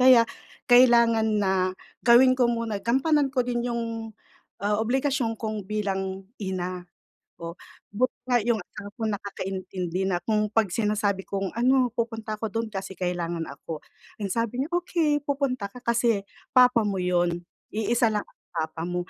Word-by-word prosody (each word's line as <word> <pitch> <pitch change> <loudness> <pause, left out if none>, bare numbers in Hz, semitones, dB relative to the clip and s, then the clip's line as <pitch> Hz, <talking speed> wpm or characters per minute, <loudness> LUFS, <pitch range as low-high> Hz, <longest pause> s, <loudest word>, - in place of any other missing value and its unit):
Kaya 250 -2 +8 0.4
kailangan 235 -3 +6
na 195 -2 +2 0.5
gawin 250 +2 +7
ko 255 -2 +3
muna, 230 -3 -1
gampanan 275 +5 +2
ko 255 -2 0
din 240 -1 -1
yung, 235 -1 -1 0.8
ah, 210 +1 +2
obligasyon 255 0 0
kong 215 -2 -4
bilang 195 -2 -2 0.2
ina. 185 -2 -4 0.5
Oh, 170 +1 -6 0.3
buti 245 +5 0 0.2
nga 245 - +5
yung 230 -3 +1
asawa 205 +3 -10
ko 235 - -13
nakakaintindi 190 -2 -3
na 180 -2 0
kung 215 +3 +1
'pag 220 -3 +3
sinasabi 205 -1 0
kong, 195 -1 -2
"Ano, 255 +1 +4
pupunta 225 -2 -3
ako 215 -1 -4
do'n 225 0 -1
kasi 195 -2 -5
kailangan 175 -2 -3
ako." 160 -2 -7 0.4
Ang 200 - -2
sabi 230 +4 -1
niya, 285 - -3
"Okey, 330 -4 +1
pupunta 275 -6 -1
ka 240 +5 -9
kasi 235 -3 +2 0.3
papa 250 -3 +6
mo 195 -2 -1
'yon. 175 -1 +1 0.3
Iisa 225 +1 +2
lang 210 - +1
ang - - -31
papa 160 0 -3
mo." 175 -1 -3
220 Hz, 155 wpm, -26 LUFS, 190-245 Hz, 0.8 s, Kaya